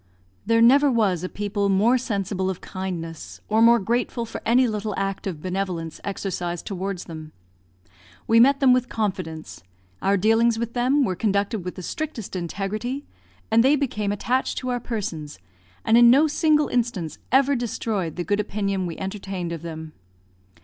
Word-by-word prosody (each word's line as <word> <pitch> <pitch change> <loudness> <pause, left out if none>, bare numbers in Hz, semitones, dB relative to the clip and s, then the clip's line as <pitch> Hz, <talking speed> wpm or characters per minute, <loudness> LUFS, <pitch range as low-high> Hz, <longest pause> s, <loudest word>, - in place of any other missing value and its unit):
There 230 0 +4
never 280 +4 +6
was 205 -8 +1
a 185 - -3
people 205 -1 -2
more 210 +6 +4
sensible 195 -5 -2
of 185 - -4
kindness, 170 -4 -6
or 220 +1 +2
more 235 +1 +7
grateful 235 +2 -1
for 225 - -7
any 250 +2 +4
little 210 -2 -3
act 195 0 -2
of 160 -5 -5
benevolence 180 -3 -3
exercised 180 -4 -4
towards 195 -1 -4
them. 155 -2 -9 0.9
We 225 0 +4
met 275 +4 +5
them 260 -2 +6
with 250 0 +1
confidence; 185 -7 -4 0.4
our 200 +1 +2
dealings 225 +3 +3
with 235 0 -3
them 255 +4 +2
were 185 -4 -1
conducted 200 +1 0
with 180 - -5
the 185 - -8
strictest 265 - -5
integrity; 210 - -3 0.5
and 225 +1 +5
they 275 +3 +5
became 215 -8 -1
attached 245 +5 -1
to 255 - -3
our 245 -1 0
persons, 180 - -5 0.5
and 225 - +4
in 240 0 +8
no 275 +6 +6
single 305 0 +2
instance 225 -10 -2
ever 275 +2 +4
destroyed 215 - -2
the 175 - -3
good 205 +3 0
opinion 200 -3 -1
we 165 - -6
entertained 190 -3 -5
of 165 -2 -5
them. 160 -1 -7
205 Hz, 165 wpm, -24 LUFS, 185-235 Hz, 0.9 s, in